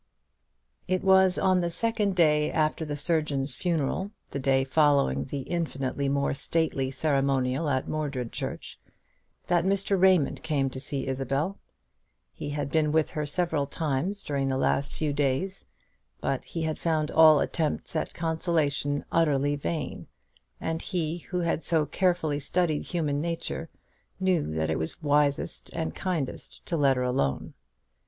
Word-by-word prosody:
It 185 0 0
was 190 -1 +5
on 185 -1 +3
the 170 - 0
second 210 +2 +1
day 150 -3 +3
after 155 0 0
the 145 -1 -4
surgeon's 145 -4 +2
funeral, 170 +4 -1 0.2
the 140 - -3
day 135 0 +2
following 140 - +2
that 140 - -4
infinitely 140 -5 -2
more 140 0 +1
stately 140 -1 0
ceremonial 135 0 0
at 130 -2 0
Mordred 140 -6 -3
church, - - -5 0.7
that 175 -1 +2
Mr. 195 0 +2
Raymond 185 -6 +4
came 140 -4 0
to 130 - -6
see 135 0 -1
Isabel. 135 +7 -2 0.7
He 145 - -6
had 145 -1 -3
been 155 -2 +2
with 155 0 +2
her 150 -1 -3
several 155 -2 +1
times 160 +7 -2
during 140 -2 -1
the 130 0 0
last 140 +1 +1
few 150 -2 -2
days; 145 +7 -1 0.5
but - - -2
he 165 -2 -4
had 155 -1 -2
found 155 -2 0
all 155 -2 +7
attempts 160 0 -1
at 155 - -2
consolation 160 -4 0
utterly 145 -3 +2
in 145 - -4
vain, 150 -2 -4 0.5
and 160 0 -3
he, 170 -2 -2
who 180 +1 -3
had 165 -1 -1
so 160 -3 +2
carefully 170 -3 0
studied 155 +1 0
human 150 -5 -1
nature, 165 0 -3 0.5
knew 185 - +1
that 80 0 0
it 80 - -1
was 80 - -2
wisest 145 -1 +1
and 80 0 -3
kindest 170 -8 -4
to 170 - -2
let 140 -4 +3
her 125 - 0
alone. 125 - -1
150 Hz, 150 wpm, -27 LUFS, 140-170 Hz, 0.7 s, all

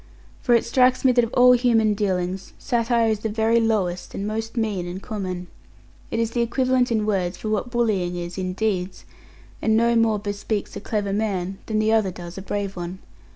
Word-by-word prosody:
For 240 - +4
it 230 - +2
strikes 255 +2 +3
me 260 - +7
that 245 -1 +4
of 230 - -3
all 250 0 +7
human 230 -3 +4
dealings, 190 -2 -2
satire 235 -2 +1
is 215 - -1
the 220 - -3
very 225 +2 +2
lowest, 200 -6 -1
and 195 - -3
most 225 +2 -4
mean 205 -6 -1
and 180 +2 -5
common. 190 -5 -5 0.6
It - - -2
is 230 0 0
the 240 - 0
equivalent 255 +1 +1
in 220 -2 +1
words 185 -4 -1
of 215 - -1
what 215 +3 -1
bullying 210 -7 0
is 175 0 -5
in 185 -1 -3
deeds; 190 -3 -2 0.6
and 220 0 +3
no 235 +1 +3
more 225 -2 +3
bespeaks 205 0 -3
a - - -5
clever 205 -2 -2
man, 195 -3 -2
than 215 - -1
the 215 0 +2
other 220 -4 +3
does 175 -1 -9
a 195 - -6
brave 200 0 -3
one. 175 +1 -5
215 Hz, 200 wpm, -23 LUFS, 190-230 Hz, 0.6 s, me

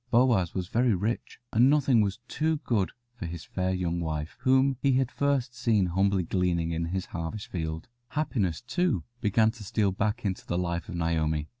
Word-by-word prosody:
Boaz 120 -8 +3
was 90 -2 -2
very 120 +1 +2
rich, 105 +6 -2 0.2
and 120 +4 +6
nothing 135 -5 +4
was 100 0 0
too 160 +1 0
good 105 -6 +1 0.2
for 115 -8 -6
his 85 -1 -6
fair 95 0 -1
young 90 -2 -1
wife, 80 -2 -3
whom 130 +1 +3
he 140 -1 +3
had 130 -1 +1
first 140 -3 0
seen 110 -6 +2
humbly 95 +2 +2
gleaning 85 -1 0
in 85 0 -1
his 95 +2 -2
harvest 85 +5 -5
field. 80 -2 -4 0.2
Happiness, 120 - -1
too, 145 - 0 0.2
began 110 +1 +3
to 115 -2 -11
steal 100 0 +1
back 105 +4 -1
into 95 -2 -2
the 85 - -2
life 85 -1 -2
of - - -5
Naomi. 80 -2 0
100 Hz, 185 wpm, -28 LUFS, 85-120 Hz, 0.2 s, and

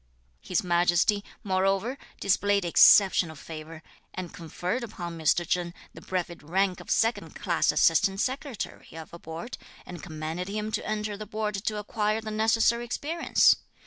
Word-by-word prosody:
His 180 - -1
Majesty, 175 +3 +2 0.2
moreover, 195 +5 +1 0.2
displayed 200 0 +2
exceptional 175 -1 +6
favour, 160 +1 -9 0.3
and 185 0 -6
conferred 180 +6 -4
upon 175 -6 -6
Mr. 165 +1 +1
Cheng 175 0 -1 0.2
the - - -12
brevet 175 -2 -4
rank 185 +4 0
of - - -12
second 225 +1 0
class - - +1
Assistant 195 -1 +3
Secretary 260 -1 -4
(of 160 +1 -10
a 170 - -9
Board), 165 +9 -7 0.3
and 175 -3 -9
commanded 160 +3 -5
him 215 +2 -3
to 215 - -2
enter 210 -1 -2
the 215 0 -8
Board 215 0 -2
to 210 +2 -2
acquire 210 +1 -1
the 220 -1 -6
necessary 225 +2 +2
experience. 300 +7 +2
195 Hz, 145 wpm, -27 LUFS, 170-215 Hz, 0.3 s, exceptional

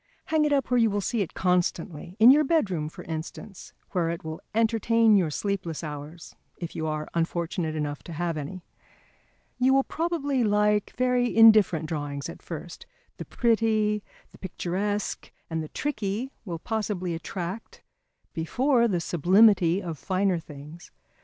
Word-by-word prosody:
Hang 315 -1 +2
it 300 - 0
up 275 -3 +1
where 250 - +4
you 225 -1 +4
will 205 0 -1
see 225 +3 -1
it 190 - -4
constantly; 180 -1 -1
in 230 +3 +9
your 300 +2 +5
bedroom, 190 - 0
for - - -11
instance, 165 +5 -7 0.2
where 170 -3 0
it 170 0 -4
will 160 0 -6
entertain 225 0 +3
your 180 -5 +3
sleepless 175 -1 -3
hours, 150 +2 -8 0.2
if 170 -2 -7
you 160 - -2
are 155 0 -3
unfortunate 170 -1 -2
enough 145 -1 -3
to 170 - -7
have 170 +1 -2
any. 155 +5 -6 1.0
You 260 +1 +4
will 270 - +4
probably 290 -6 -1
like 210 -1 +1
very 250 -1 +1
indifferent 215 -8 +6
drawings 145 -2 -4
at - - -10
first, 165 +1 -8 0.3
the - - -6
pretty, 220 -2 +1 0.3
the - - -17
picturesque 195 +3 -3 0.2
and 160 0 -1
the 155 - -7
tricky 230 -2 -3
will 170 -4 -4
possibly 195 -2 -3
attract 175 +5 -6 0.5
before 235 - +2
the 185 -6 0
sublimity 180 +2 +4
of 165 -5 -5
finer 190 -2 0
things. 150 +2 -12
190 Hz, 155 wpm, -26 LUFS, 165-225 Hz, 1.0 s, in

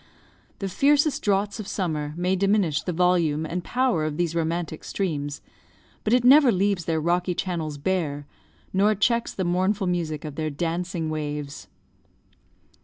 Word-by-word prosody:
The 195 - -3
fiercest 290 - +2
droughts 205 +1 0
of 210 - -6
summer 155 -5 -2
may 180 +2 +1
diminish 195 -5 +2
the 180 - -3
volume 170 -3 +2
and 175 +3 -3
power 250 -10 +1
of 155 -1 -2
these 170 -2 0
romantic 165 -1 -2
streams, 145 -7 -3 0.6
but 215 - 0
it 245 0 +4
never 270 +1 +7
leaves 195 -3 0
their 160 -1 0
rocky 175 +2 0
channels 165 -6 -3
bare, 145 -3 -2 0.5
nor 205 +3 +3
checks 235 +3 +1
the 190 - -3
mournful 190 +3 +1
music 165 -4 -2
of 150 - -5
their 155 -1 -1
dancing 170 +2 -2
waves. 150 -2 -5
175 Hz, 150 wpm, -25 LUFS, 155-195 Hz, 0.6 s, never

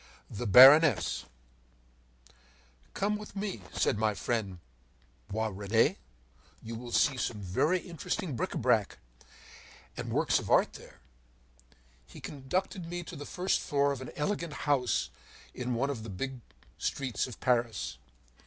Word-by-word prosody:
THE 115 +3 -4
BARONESS 135 +8 +7 1.7
“Come 210 +1 0
with 210 0 -11
me,” 195 - -4
said 105 - 0
my 110 -1 +1
friend 105 -6 -2 0.7
Boisrene, 110 +1 +1 0.7
“you 115 - -6
will 120 +1 -7
see 135 +2 +3
some 115 -3 -2
very 105 - +1
interesting 175 -3 -4
bric - - -3
a - - -1
brac - - +1 1.0
and - - -5
works - - +2
of - - -7
art - - +4
there.” - - -14 1.1
He - - -12
conducted 165 +6 -3
me 175 +1 -4
to - - -9
the 145 - -8
first 185 +1 0
floor 140 0 +1
of 135 -2 -4
an 130 - -7
elegant 170 0 -2
house 135 -4 +1 0.4
in 125 -1 -3
one 135 +4 0
of 120 -6 -5
the 110 - -8
big 130 +7 -5 0.4
streets 130 -6 -2
of 125 - -10
Paris. 115 - 0
130 Hz, 135 wpm, -30 LUFS, 110-155 Hz, 1.7 s, BARONESS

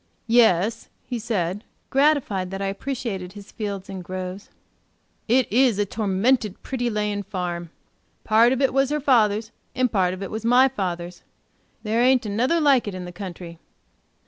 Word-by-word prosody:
"Yes," 225 -2 +3 0.2
he 245 -2 -4
said, 205 -3 -2 0.3
gratified 270 -10 +2
that 195 +1 -5
I 195 - -2
appreciated 200 -4 -4
his 205 -1 -12
fields 200 -3 -5
and 190 -2 -7
groves, 185 +2 -6 0.8
"it 250 +2 +4
is 245 -3 +4
a 205 - +1
tormented 210 +2 0
pretty 245 -2 -2
laying 210 -2 -1
farm. 175 -3 -4 0.5
Part 230 +2 +4
of 265 +1 0
it 265 - +2
was 270 0 +2
her 300 0 0
father's, 220 -5 +2 0.2
and 255 -2 +1
part 185 -3 +1
of 190 - -7
it 195 - -6
was 220 0 -4
my 245 +3 +5
father's; 180 -7 -4 0.6
there 220 +2 +1
ain't 255 -1 +4
another 245 +11 +1
like 275 -7 +3
it 200 - -4
in 180 -1 -6
the 180 - -8
country. 175 -3 -8
210 Hz, 165 wpm, -23 LUFS, 185-245 Hz, 0.8 s, my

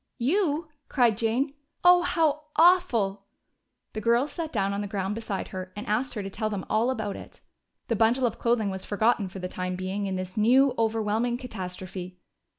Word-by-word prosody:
"You!" 310 - 0 0.2
cried 240 -5 +3
Jane. 235 +6 0 0.3
"Oh, 355 0 +7
how 310 -4 +1
awful!" 240 - +3 0.7
The 215 - -4
girls 235 +6 +2
sat 330 -3 -4
down 200 -3 0
on 200 - -2
the 205 - -3
ground 195 0 -2
beside 210 -3 -4
her 185 0 -6
and 205 - -6
asked 245 +5 -1
her 210 - -3
to 195 - -5
tell 215 +2 -2
them 205 -3 -4
all 225 +3 +2
about 220 -6 -2
it. - - -11 0.5
The 230 - 0
bundle 230 +4 +3
of 230 - -2
clothing 235 -4 +1
was 190 0 -5
forgotten 210 -1 +1
for 195 - -9
the 180 -1 -4
time 185 0 -4
being 190 +2 -3
in 190 - -2
this 185 0 -5
new, 255 +5 +4
overwhelming 225 +1 0
catastrophe. 185 -5 -7
220 Hz, 185 wpm, -27 LUFS, 195-255 Hz, 0.7 s, Oh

